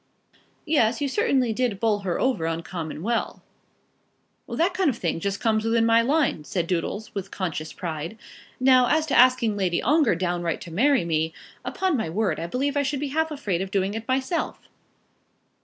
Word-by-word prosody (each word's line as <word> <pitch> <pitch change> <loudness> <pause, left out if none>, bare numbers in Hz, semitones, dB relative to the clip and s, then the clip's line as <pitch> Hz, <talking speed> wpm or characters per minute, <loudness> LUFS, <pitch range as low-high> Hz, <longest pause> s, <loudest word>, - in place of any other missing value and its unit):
"Yes; 250 -8 +2
you 290 - 0
certainly 265 - +1
did 235 -4 -1
bowl 215 -2 +2
her 190 -3 -2
over 255 -11 +1
uncommon 165 -1 -4
well." 235 +2 -2 1.1
"That 345 +3 +1
kind 365 -3 +2
of 240 - -2
thing 170 -4 -2
just 200 +3 -2
comes 220 -1 +1
within 225 0 +2
my 230 0 +5
line," 275 - +1
said 175 0 -2
Doodles, 185 +5 -3
with 195 -1 -5
conscious 160 -5 -4
pride. 165 +3 -5 0.4
"Now, 255 -1 +5
as 310 +3 +2
to 305 - -1
asking 245 -3 +5
Lady 180 -3 +1
Ongar 290 - +3
downright 175 -1 -2
to 170 - -9
marry 255 - +3
me, 160 -1 0 0.3
upon 375 -4 -1
my 220 -8 -2
word 200 +2 0
I 165 - -3
believe 275 - -1
I 285 - +3
should 280 0 -1
be 290 0 -3
half 320 +3 0
afraid 215 - -2
of 190 - -3
doing 195 0 0
it 225 +2 -6
myself." 265 +6 -1
225 Hz, 180 wpm, -25 LUFS, 175-265 Hz, 1.1 s, my